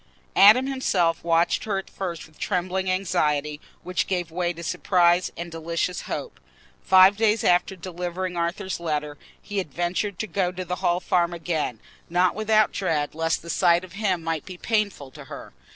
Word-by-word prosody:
Adam 215 Hz, +6 st, +7 dB
himself 190 Hz, -11 st, 0 dB
watched 165 Hz, 0 st, +2 dB
her 205 Hz, -3 st, -1 dB
at 195 Hz, -, -5 dB
first 175 Hz, -4 st, -5 dB
with 155 Hz, 0 st, -21 dB
trembling 185 Hz, 0 st, -1 dB
anxiety, 150 Hz, -5 st, 0 dB, 0.2 s
which 180 Hz, 0 st, -1 dB
gave 175 Hz, -4 st, -2 dB
way 175 Hz, +1 st, -1 dB
to 170 Hz, 0 st, -9 dB
surprise 180 Hz, 0 st, +2 dB
and 170 Hz, 0 st, -6 dB
delicious 170 Hz, +2 st, -2 dB
hope. -, -, -5 dB, 0.4 s
Five 190 Hz, +1 st, +6 dB
days 220 Hz, -1 st, +2 dB
after 180 Hz, +2 st, +2 dB
delivering 180 Hz, +1 st, -5 dB
Arthur's 170 Hz, +2 st, -2 dB
letter, 150 Hz, -3 st, -2 dB, 0.2 s
he 205 Hz, -1 st, -4 dB
had 180 Hz, -6 st, -5 dB
ventured 175 Hz, +4 st, -2 dB
to 220 Hz, -, -2 dB
go 190 Hz, -4 st, -1 dB
to 180 Hz, 0 st, -6 dB
the 180 Hz, +1 st, -3 dB
Hall 175 Hz, -1 st, +1 dB
Farm 175 Hz, -1 st, +1 dB
again—not 170 Hz, +2 st, -2 dB
without 215 Hz, +1 st, +2 dB
dread 155 Hz, -6 st, -1 dB
lest 165 Hz, +1 st, -1 dB
the 170 Hz, -, -10 dB
sight 175 Hz, -1 st, +3 dB
of 180 Hz, -2 st, -12 dB
him 195 Hz, -5 st, -1 dB
might 165 Hz, -1 st, -2 dB
be 185 Hz, -2 st, -9 dB
painful 200 Hz, -, -1 dB
to -, -, -12 dB
her. -, -, -10 dB
180 Hz, 170 wpm, -24 LUFS, 165-190 Hz, 0.4 s, Adam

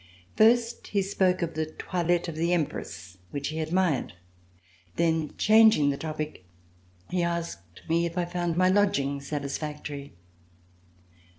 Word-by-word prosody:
First 230 Hz, +1 st, +3 dB
he 200 Hz, -2 st, 0 dB
spoke 185 Hz, -2 st, +1 dB
of 165 Hz, -1 st, -3 dB
the 155 Hz, 0 st, -2 dB
toilette 175 Hz, +2 st, -1 dB
of 165 Hz, -, -4 dB
the 170 Hz, +2 st, +1 dB
Empress 95 Hz, -, -3 dB
which 140 Hz, 0 st, -3 dB
he 155 Hz, +1 st, -4 dB
admired. 160 Hz, -, 0 dB, 0.8 s
Then, 160 Hz, -2 st, 0 dB
changing 215 Hz, -9 st, +5 dB
the 140 Hz, -, -3 dB
topic, 155 Hz, -, -5 dB, 0.7 s
he 180 Hz, -, +1 dB
asked 170 Hz, -, -4 dB
me 170 Hz, +1 st, +2 dB
if 170 Hz, +1 st, -8 dB
I 175 Hz, -, +1 dB
found 175 Hz, -1 st, -2 dB
my 185 Hz, 0 st, +4 dB
lodging 185 Hz, -8 st, +2 dB
satisfactory. 145 Hz, -, -5 dB
165 Hz, 130 wpm, -27 LUFS, 150-180 Hz, 0.8 s, changing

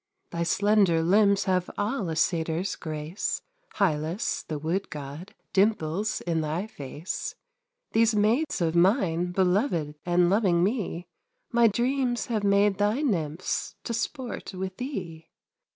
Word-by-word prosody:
Thy 170 Hz, -, -3 dB
slender 190 Hz, -1 st, +3 dB
limbs 200 Hz, +3 st, +4 dB
have 185 Hz, -1 st, 0 dB
all 205 Hz, -2 st, -1 dB
a 160 Hz, -, -2 dB
Satyr's 165 Hz, +2 st, 0 dB
grace, 155 Hz, +3 st, -3 dB, 0.4 s
Hylas, 165 Hz, 0 st, 0 dB
the 155 Hz, -, -3 dB
Wood 165 Hz, +6 st, -2 dB
God, 150 Hz, +5 st, -8 dB, 0.2 s
dimples 200 Hz, 0 st, +1 dB
in 165 Hz, -2 st, 0 dB
thy 155 Hz, +5 st, -2 dB
face; 150 Hz, -3 st, -6 dB, 0.6 s
These 225 Hz, 0 st, +3 dB
maids 230 Hz, -, +2 dB
of 165 Hz, -1 st, +1 dB
mine, 180 Hz, -2 st, +3 dB
beloved 180 Hz, -, +1 dB
and 175 Hz, 0 st, +3 dB
loving 185 Hz, -3 st, +3 dB
me, 195 Hz, -5 st, -1 dB, 0.5 s
My 235 Hz, -1 st, +5 dB
dreams 245 Hz, +3 st, 0 dB
have 215 Hz, -2 st, 0 dB
made 200 Hz, 0 st, +3 dB
thy 210 Hz, +8 st, +1 dB
Nymphs 170 Hz, -, -1 dB
to 235 Hz, -, -3 dB
sport 235 Hz, -3 st, -4 dB
with 185 Hz, 0 st, -4 dB
thee. 180 Hz, -, -6 dB
190 Hz, 130 wpm, -27 LUFS, 165-215 Hz, 0.6 s, My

